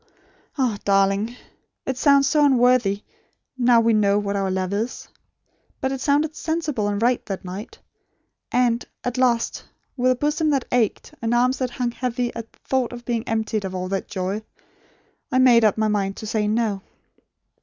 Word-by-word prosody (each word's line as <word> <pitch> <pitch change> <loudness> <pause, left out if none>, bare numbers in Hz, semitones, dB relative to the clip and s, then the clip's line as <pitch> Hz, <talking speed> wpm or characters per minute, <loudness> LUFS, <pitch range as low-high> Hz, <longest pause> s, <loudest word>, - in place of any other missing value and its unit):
Ah, 245 -7 0
darling! 195 +3 +2 0.5
It 265 - -2
sounds 280 +1 +4
so 295 +1 +3
unworthy, 245 -7 +3 0.5
now 245 -2 +4
we 230 0 +3
know 205 -1 +3
what 200 -1 -1
our 195 -1 0
love 185 0 -2
is. 220 +4 -3 0.7
But 265 - -1
it 270 -1 -4
sounded 295 +2 +1
sensible 315 -11 -2
and 205 0 -1
right 240 +2 +2
that 195 -2 -5
night; 190 +5 -7 0.7
and 245 -1 +2 0.2
at 245 +1 -2
last, 240 -2 +1 0.3
with 255 -1 +2
a - - +2
bosom 300 +4 0
that 275 -4 +1
ached, 235 -4 0
and 230 +1 0
arms 255 +2 +2
that 255 -1 -1
hung 245 0 -2
heavy 245 0 -2
at 230 -1 -7
the - - -29
thought 260 -2 0
of 240 0 -9
being 235 -2 -2
emptied 220 -1 -1
of 190 -1 -5
all 185 0 -3
that 195 0 -2
joy, 190 +2 -3 0.9
I 255 - +2
made 245 -3 +6
up 215 -1 +3
my 220 0 +2
mind 200 -2 -1
to - - -7
say 215 -1 0
'no.' 215 -2 0
235 Hz, 175 wpm, -23 LUFS, 205-255 Hz, 0.9 s, made